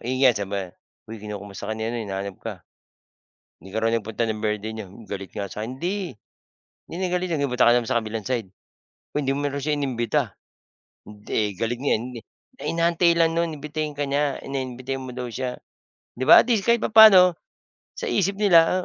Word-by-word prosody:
Iyan 130 +1 +3
saba 100 -3 -4 0.3
"Huy, 110 0 -9
kinakamusta 100 -1 -7
ka 110 - -2
ni 110 - -3
ano, 115 +1 -2
hinahanap 100 -2 -5
ka. - - -5 1.0
Di 95 +1 -13
ka 110 - -1
raw 115 - +3
nagpunta 110 0 -2
ng 110 -1 -2
birthday 105 0 -2
niya. 110 -2 -7
Hmm, 95 +5 -14
galit 100 -2 -7
nga 100 -1 -4
sa'kin. 110 +5 -5
Hindi, 190 +1 -2 0.7
hindi - - -7
na 185 - 0
galit 180 0 0
yun. 145 - -1
Nagpunta 125 -3 +2
ka - - +7
naman 120 -2 +1
sa 125 - +3
kabilang 110 0 -5
side. 120 -5 -2 0.6
Huy, 150 - 0
hindi 135 - +1
mo 145 - -2
raw 140 - -4
siya 150 +2 0
inimbita. 125 -5 -1 0.8
Hindi 105 -1 -3
galit 115 +2 -2
nga 140 - +2
hindi. 120 +1 -7 0.4
Eh, - - -3
inaantay 170 0 +3
lang 165 -1 +4
no'n 165 -2 -1
imbitahin 150 0 -4
ka 145 - -1
niya, 140 0 0
na 135 0 -3
imbitahin 130 +1 -5
mo 130 - -7
daw 125 - -3
siya." 125 +1 -3 0.6
Di 125 - -5
ba, - - +9
at - - -1
least 225 -5 +2
kahit 235 0 +4
papaano 200 -6 +8 0.6
sa - - -5
isip 200 - +1
nila, 180 -2 +5
125 Hz, 195 wpm, -24 LUFS, 110-160 Hz, 1.0 s, ba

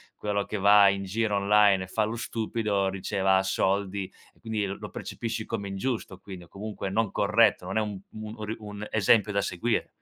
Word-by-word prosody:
quello 100 -1 -2
che - - -6
va 100 0 +7
in 100 0 +1
giro 105 +2 -1
online 100 -1 +4
e 95 - -8
fa 110 +3 0
lo 110 +2 -3
stupido, 110 -3 -1
riceva 95 0 +1
soldi, 95 0 0 0.3
quindi 110 -2 -2
lo 95 +1 -6
percepisci 115 -1 -5
come 105 -3 -4
ingiusto, 100 -1 -3
quindi 95 -2 -10
o - - -22
comunque 100 +1 -6
non 110 +1 0
corretto, 105 -2 +3
non 95 +3 -3
è 110 - +3
un 105 -2 -4
un 110 0 -8
ri 110 +1 -4
un 105 0 -7
esempio 105 0 +3
da 100 - +2
seguire. 110 +5 -1
105 Hz, 185 wpm, -27 LUFS, 95-110 Hz, 0.3 s, va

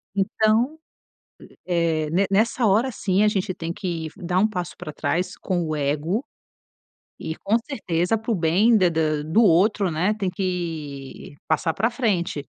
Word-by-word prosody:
Então, 220 +8 +1 0.9
eh, 165 -3 0
ne 190 +4 +2
nessa 225 +4 +2
hora, 220 +6 +3
sim, 200 -2 +1
a - - +5
gente 195 -2 0
tem 165 -1 -5
que 170 -4 -4
dar 180 -1 0
um 215 - +4
passo 180 -4 -4
pra 155 - -7
trás 180 +4 -2
com 180 -3 -1
o 155 - -2
ego. 150 - -1 1.0
E 160 - -3
com 205 +3 0
certeza 180 - -1
para 225 +2 -4
o 220 - +2
bem 185 +8 +3
da 185 -4 +4
da 155 -2 0
do 160 +10 +3
outro, 195 +1 +3
né, 175 +6 +1
tem 205 -3 -2
que 165 -8 -5
passar 160 +1 +1
pra 220 +8 0
frente. 195 - -1
180 Hz, 160 wpm, -23 LUFS, 165-215 Hz, 1.0 s, a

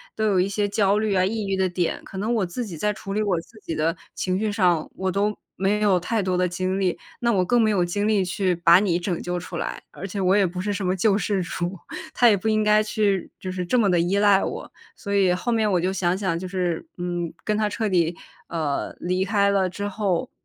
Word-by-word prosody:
都 220 - 0
有 200 -3 +3
一 185 - +2
些 205 +1 -1
焦 200 0 +2
虑 215 -1 0
啊， 185 -1 +3
抑 215 +2 -2
郁 195 0 0
的 190 0 +2
点， 175 -1 -2
可 190 - -9
能 215 +5 -1
我 210 -4 +1
自 180 +8 -4
己 180 -6 -7
在 210 +6 0
处 200 -1 -8
理 210 +2 0
我 195 -5 +1
自 215 +6 -18
己 165 - -5
的 160 +2 0 0.2
情 185 0 -1
绪 215 0 0
上， 180 -6 +2
我 190 0 -1
都 205 +2 0 0.2
没 200 +2 +1
有 200 -4 +4
太 210 +4 -1
多 185 -1 0
的 180 0 +2
精 185 +2 -2
力， 185 -3 0 0.2
那 235 -1 +2
我 185 -4 +2
更 240 +6 +3
没 220 - +3
有 190 -4 +2
精 205 +4 -1
力 205 -3 +2
去 180 0 0
把 170 +1 +6
你 190 -4 +1
拯 175 -1 -3
救 175 0 -3
出 180 - -7
来， - - -4
而 195 - -7
且 200 +1 -5
我 190 0 +3
也 200 -2 +4
不 180 +1 -6
是 205 +2 -1
什 200 - -3
么 185 0 +1
救 195 +2 +3
世 200 -1 0
主。 175 +1 -4 0.4
她 245 - +5
也 220 - +6
不 200 +3 -3
应 215 0 +2
该 210 0 +5
去 210 -4 0
就 185 - -5
是 185 0 -3
这 180 +8 +1
么 225 -4 +3
地 175 - +3
依 175 +4 +1
赖 200 -1 +4
我， - - -5 0.2
所 200 -3 -5
以 195 -2 +4
后 185 +7 -1
面 220 -2 +2
我 180 - +3
就 185 +2 0
想 185 -1 0
想， 185 -4 -1
就 185 - -5
是， 180 - -2
嗯， 175 -1 -3
跟 210 - 0
她 210 0 +1
彻 220 +1 -2
底， 175 -3 +1 0.3
呃， 155 -4 -2
离 185 +1 0
开 200 0 +2
了 190 -2 +2
之 200 +3 -4
后， 200 +1 -1
190 Hz, 280 characters per minute, -24 LUFS, 180-210 Hz, 0.4 s, 把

